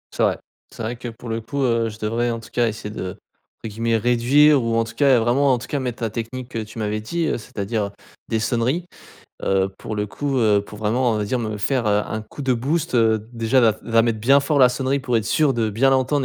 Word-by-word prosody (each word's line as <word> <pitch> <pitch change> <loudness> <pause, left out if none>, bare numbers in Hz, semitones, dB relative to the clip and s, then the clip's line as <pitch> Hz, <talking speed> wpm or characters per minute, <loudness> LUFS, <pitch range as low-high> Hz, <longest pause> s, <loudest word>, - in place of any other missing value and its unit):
C'est - - +1
vrai. - - +2 0.4
C'est - - -7
vrai 115 +2 -3
que 120 - -7
pour 115 +1 -9
le 115 0 -1
coup, 140 +5 -4
heu, 115 -2 +1
je 105 - -10
devrais 115 +2 0
en 115 - -3
tout - - -13
cas 120 -1 +2
essayer 105 -1 -5
de, 95 -3 -4 0.5
entre - - -3
guillemets, 115 +1 0
«réduire» 125 +5 +4
ou 115 0 0
en 115 - +3
tout 115 - -9
cas, 140 -2 +4
heu, - - +3
vraiment 130 +4 +3
en - - +2
tout 120 - -8
cas 145 - -2
mettre 125 -3 -4
ta 115 - -1
technique 120 +3 -6
que 115 - -4
tu 110 +1 -7
m'avais 105 0 -1
dit, 170 +10 -2
heu, - - 0
c'est-à-dire 105 -1 -3 0.4
des 110 - 0
sonneries 120 +9 0 0.6
heu, 95 0 +2
pour 110 - -5
le 105 0 -1
coup, 140 +5 -2
heu, 105 -3 +3
pour 105 - -11
vraiment, 115 +3 +1
on 105 - -1
va 105 - -1
dire, 125 +5 -1
me 110 -3 -3
faire, 120 +2 0
heu, 105 0 +2
un 110 - -4
coup 110 - -12
de 130 - +2
boost. 150 +6 -1
Heu, 110 -2 +2
déjà, 115 +2 +2
la 115 -2 +5
f - - -18
la 115 -1 +3
mettre 115 -2 0
bien 135 +5 +5
fort, 140 +1 0
la 125 -2 +7
sonnerie, 130 +2 0
pour 125 -3 0
être 110 - -4
sûr 150 -3 +2
de 115 -2 0
bien 125 +6 +3
l'entendre 135 +1 +2
115 Hz, 265 wpm, -22 LUFS, 110-130 Hz, 0.6 s, la